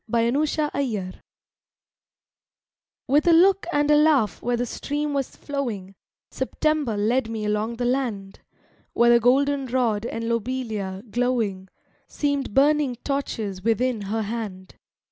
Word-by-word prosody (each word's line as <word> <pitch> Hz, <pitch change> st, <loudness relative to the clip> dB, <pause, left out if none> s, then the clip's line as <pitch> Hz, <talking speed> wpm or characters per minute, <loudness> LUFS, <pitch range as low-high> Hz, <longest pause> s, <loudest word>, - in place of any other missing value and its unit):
YOUNG 235 Hz, +6 st, +2 dB
SEPTEMBER 300 Hz, 0 st, -1 dB
I 210 Hz, -9 st, -2 dB, 1.9 s
With 295 Hz, +5 st, +3 dB
a 340 Hz, -, +7 dB
look 380 Hz, +3 st, +4 dB
and 290 Hz, -1 st, +2 dB
a -, -, +6 dB
laugh 290 Hz, -, +3 dB
where 240 Hz, 0 st, 0 dB
the 245 Hz, -, -1 dB
stream 290 Hz, +4 st, -3 dB
was 275 Hz, -2 st, -2 dB
flowing, 235 Hz, -10 st, -4 dB, 0.4 s
September 305 Hz, -8 st, -1 dB
led 225 Hz, +3 st, +1 dB
me 220 Hz, -2 st, -4 dB
along 210 Hz, +2 st, -1 dB
the 245 Hz, +1 st, -2 dB
land; 240 Hz, -7 st, -2 dB, 0.5 s
Where 235 Hz, 0 st, +4 dB
the 235 Hz, -, +6 dB
golden 275 Hz, +3 st, +2 dB
rod 235 Hz, -3 st, 0 dB
and 230 Hz, 0 st, -4 dB
lobelia, 225 Hz, -5 st, -3 dB
glowing, 230 Hz, -6 st, -1 dB, 0.4 s
Seemed 285 Hz, -6 st, -2 dB
burning 285 Hz, -2 st, +3 dB
torches 220 Hz, -9 st, -3 dB
within 230 Hz, +1 st, +1 dB
her 220 Hz, +1 st, -1 dB
hand. 205 Hz, -4 st, -6 dB
240 Hz, 130 wpm, -24 LUFS, 215-280 Hz, 1.9 s, a